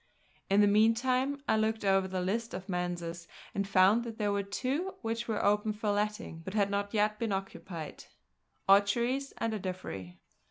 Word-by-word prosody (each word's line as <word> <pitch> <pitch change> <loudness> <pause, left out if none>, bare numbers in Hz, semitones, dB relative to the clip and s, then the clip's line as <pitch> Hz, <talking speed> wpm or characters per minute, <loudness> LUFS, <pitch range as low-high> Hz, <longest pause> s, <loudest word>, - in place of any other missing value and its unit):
In 200 +1 +5
the - - +7
meantime 250 +6 +2
I 220 - +3
looked 220 -1 0
over 195 -1 +3
the 185 -1 -2
list 225 +6 -2
of 185 - -7
Manses 175 -2 -3 0.3
and 200 0 -1
found 195 +4 +5
that 230 -2 -7
there 210 -2 0
were 200 0 +1
two 265 - -2
which 230 +1 -2
were 220 -2 -1
open 210 +1 +2
for 210 0 -1
letting, 210 -4 -2
but 190 +5 -7
had 200 -2 +2
not 200 0 -1
yet 210 -1 +1
been 230 -2 -1
occupied, 190 -4 -5 0.6
Aucheries 235 +8 +3
and 225 -1 -1
Ardiffery. 180 - -5
205 Hz, 170 wpm, -31 LUFS, 190-225 Hz, 0.6 s, the